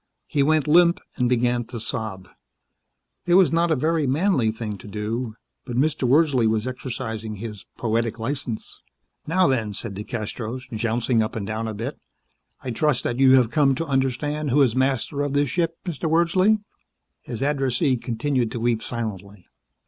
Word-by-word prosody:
He 145 - 0
went 155 +1 +2
limp 170 +2 +5 0.2
and 125 -2 +2
began 120 0 +1
to 120 +1 -7
sob. 110 -6 -5 1.0
It 175 - +4
was 185 -2 +6
not 170 +1 +2
a 160 - +3
very 155 +1 +1
manly 140 - +2
thing 110 -2 -5
to 120 - -11
do, 110 +3 -3 0.3
but 125 -2 -6
Mr. 145 -1 +1
Wordsley 140 -5 +4
was 110 0 0
exercising 115 -4 -5
his 105 -1 -8
poetic 115 0 0
license. 120 -1 -5 0.5
"Now 185 +4 +3
then," 115 - 0
said 115 -1 -2
DeCastros, 110 +4 -5
jouncing 115 +1 +1
up 110 - -2
and 105 -3 -3
down 110 +2 -3
a 110 - -4
bit. 120 +7 -5 0.6
"I 125 - -3
trust 150 +1 +1
that 120 +1 -2
you 135 -1 +7
have 125 -3 +3
come 135 0 +3
to 165 - -2
understand 145 +2 -1
who 140 +3 +5
is 125 -3 +1
master 135 +2 0
of 145 -1 -1
this 145 -2 +1
ship, 165 -1 0
Mr. 165 -2 -2
Wordsley?" 180 +6 +3 0.6
His 115 +2 -5
addressee 135 -1 +1
continued 120 0 -1
to 120 - -3
weep 115 -1 +1
silently. 100 -5 -6
125 Hz, 170 wpm, -23 LUFS, 115-145 Hz, 1.0 s, you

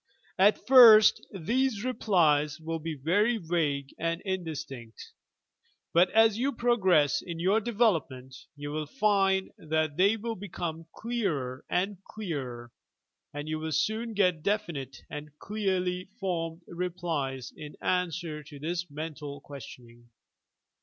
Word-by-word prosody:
At 205 +3 +4
first 230 -5 +8
these 230 +4 0
replies 160 - +2
will 165 +1 -4
be 160 0 -4
very 205 - +2
vague 155 -7 -1
and 165 0 -1
indistinct, 155 - -6 0.8
but 175 +2 +5
as 225 0 +4
you 275 +3 0
progress 190 - +3
in 170 -2 -7
your 190 +5 +3
development 175 - 0 0.2
you 145 0 -6
will 155 0 -3
find 195 - +2
that 155 -1 -1
they 200 +4 +4
will 225 +1 -4
become 170 -4 -6
clearer 165 - -2
and 195 +1 -1
clearer, 130 - -6 0.6
and 145 +1 -6
you 155 0 -2
will 160 0 -4
soon 220 +8 -1
get 180 -5 +2
definite 155 - -2
and 150 0 -9
clearly 185 -3 -1
formed 170 -3 -3
replies 170 -7 -3
in 150 -1 -9
answer 175 -3 -1
to 150 -1 -12
this 170 +4 -3
mental 150 -1 -6
questioning. 120 -4 -12
170 Hz, 125 wpm, -29 LUFS, 150-200 Hz, 0.8 s, first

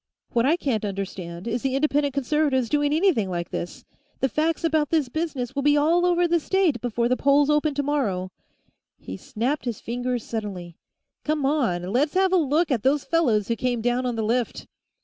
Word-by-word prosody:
What 235 +1 +2
I 325 +4 +3
can't 250 - -1
understand 190 -2 -5
is 235 +1 -1
the 265 -1 -1
Independent 285 -1 +1
Conservatives 280 -3 +1
doing 290 -1 +1
anything 310 - +2
like 175 -1 -4
this. 175 - -6 0.3
The 265 - +1
facts 320 +4 0
about 315 -3 +1
this 310 -6 +1
business 275 -5 -3
will 280 - -1
be 295 +1 +4
all 335 +4 +3
over 350 0 +3
the 340 0 +2
state 335 - +1
before 235 -1 0
the 255 - +2
polls 285 +2 +3
open 300 -1 +1
tomorrow 265 -11 -1 0.3
" - - -45 0.3
He - - -8
snapped 265 +2 -3
his 235 -3 -3
fingers 245 0 -3
suddenly. 190 -7 -6 0.5
"Come 300 -2 0
on; 250 - +1
let's 290 +7 +1
have 380 0 +3
a - - +5
look 315 +1 +1
at 240 -5 +1
those 275 +3 +2
fellows 235 -12 +1
who 230 - 0
came 245 0 -1
down 245 +2 0
on 245 - -2
the 225 - -2
lift!" 235 +2 -1
270 Hz, 195 wpm, -24 LUFS, 230-300 Hz, 0.5 s, a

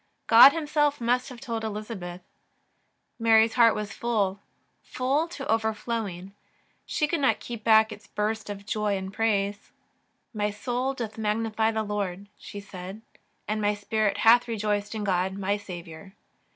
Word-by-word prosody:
God, 235 +4 +9
Himself, 295 -2 0
must 245 +2 0
have 250 -2 -10
told 230 -4 -4
Elizabeth. 205 -5 -6 1.0
Mary's 225 0 +4
heart 230 -2 +5
was 210 0 -4
full, 205 -5 -1 0.4
full 275 +6 -1
to 290 -5 -7
overflowing. 220 -4 -2 0.5
She 300 - 0
could 335 +1 -1
not 270 - +2
keep 235 -3 -7
back 220 0 +5
its 210 0 -11
burst 215 +1 -3
of 200 0 -7
joy 210 -1 -1
and 190 0 -6
praise: 205 -2 -1 0.3
" - - -46 0.3
My 210 -1 0
soul 245 +5 -2
doth 225 -3 -6
magnify 220 +1 0
the 220 -1 -1
Lord," 200 -2 -4
she 205 - -8
said, 195 +1 -9 0.2
" - - -45
and 215 0 -1
my 210 0 +1
spirit 210 0 -1
hath 240 +2 +5
rejoiced 210 -1 -2
in 215 - -3
God 190 -1 0
my 200 +1 0
Saviour. 180 -2 -9
215 Hz, 155 wpm, -26 LUFS, 205-230 Hz, 1.0 s, God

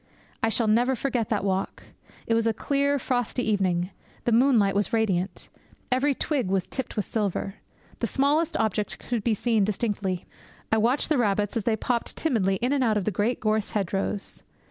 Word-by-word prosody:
I 225 - +2
shall 230 +1 +1
never 240 +5 +3
forget 245 -4 -1
that - - 0
walk! 190 0 -2 0.4
It 230 - +1
was 230 0 +2
a 225 - +1
clear, 280 +3 +1
frosty 245 -2 -1
evening. 185 -3 +1 0.3
The 240 - +1
moonlight 230 -4 +4
was 200 +1 0
radiant. 200 -5 0 0.4
Every 270 +2 +2
twig 275 -7 0
was 190 -1 0
tipped 265 -3 -5
with 210 - -1
silver. 200 -2 -2 0.4
The - - 0
smallest 295 +4 +1
object 210 -1 -1
could 235 -4 -3
be 225 -1 +2
seen 225 -1 +2
distinctly. 200 -3 -1 0.5
I 220 - +4
watched 245 +6 +2
the 300 -4 +2
rabbits 205 -2 +1
as 225 -3 -1
they 230 - +2
popped 235 +2 -2
timidly 215 -11 +1
in 255 +3 +2
and 275 -2 +2
out 220 -3 +2
of 200 - -1
the 215 - +1
great 210 +6 0
gorse 215 -1 0
hedgerows. 195 0 -1
220 Hz, 185 wpm, -26 LUFS, 200-250 Hz, 0.5 s, moonlight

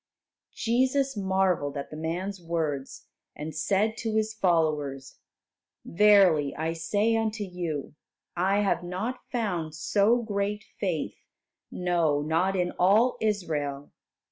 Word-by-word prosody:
Jesus 260 +3 +1
marvelled 190 -7 0
at 140 - -6
the - - -7
man's 175 +5 -4
words, 160 -5 -3 0.3
and 155 +1 -6
said 200 +8 +1
to 225 -1 -2
His 220 0 +1
followers, 155 -8 0 0.7
"Verily, 180 -7 +4
I 160 +1 -2
say 205 +7 +1
unto 220 -1 -1
you, 175 -7 -4 0.4
I 195 +4 +2
have 195 -4 +1
not 185 +8 -4
found 180 -10 -2
so 205 +9 +2
great 205 -1 -2 0.2
faith, 180 -7 -2 0.5
no, 170 -5 +1
not 165 +5 +1
in 180 -1 0
all 215 +7 +4
Israel." 155 -10 -2
180 Hz, 115 wpm, -27 LUFS, 160-210 Hz, 0.7 s, Verily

